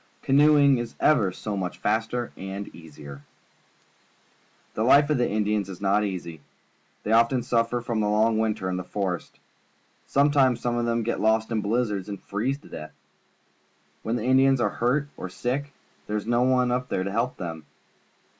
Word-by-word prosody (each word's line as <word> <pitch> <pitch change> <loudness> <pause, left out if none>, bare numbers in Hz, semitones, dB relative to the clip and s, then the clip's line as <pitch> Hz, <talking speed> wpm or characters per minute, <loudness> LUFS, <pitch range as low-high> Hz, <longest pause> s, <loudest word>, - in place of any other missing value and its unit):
Canoeing 140 -1 +5
is 120 -1 -6
ever 110 -11 +3
so 105 +3 -5
much 90 -2 -4
faster 115 +2 -1
and 95 +1 -7
easier. 75 -4 -11 1.5
The - - -3
life 140 +5 +5
of 145 - +2
the 120 - +1
Indians 105 -1 0
is 95 - -8
not 100 +1 +2
easy. 85 -6 -5 0.6
They 105 - -2
often 115 +2 +3
suffer 115 0 0
from 115 -2 -2
the 105 -1 +1
long 110 +1 +2
winter 110 -4 -1
in 90 0 -2
the 90 - -4
forest. 90 -2 -4 0.7
Sometimes 140 -3 +3
some 120 0 -1
of 120 0 0
them 115 0 0
get 120 - -2
lost 110 +1 +1
in 110 -2 0
blizzards 105 -2 -1
and 100 -2 -5
freeze 120 +7 -2
to - - -16
death. 75 - -8 1.1
Wlien 115 - -1
the 120 - -3
Indians 135 +1 +4
are - - +2
hurt 140 +5 0
or 95 - -6
sick, 135 +8 -3 0.4
there 105 - -1
is 105 - -5
no 120 +1 +1
one 125 0 +3
to 120 -6 -1
help 115 +5 -1
them. 80 -4 -6
110 Hz, 170 wpm, -25 LUFS, 100-125 Hz, 1.5 s, Canoeing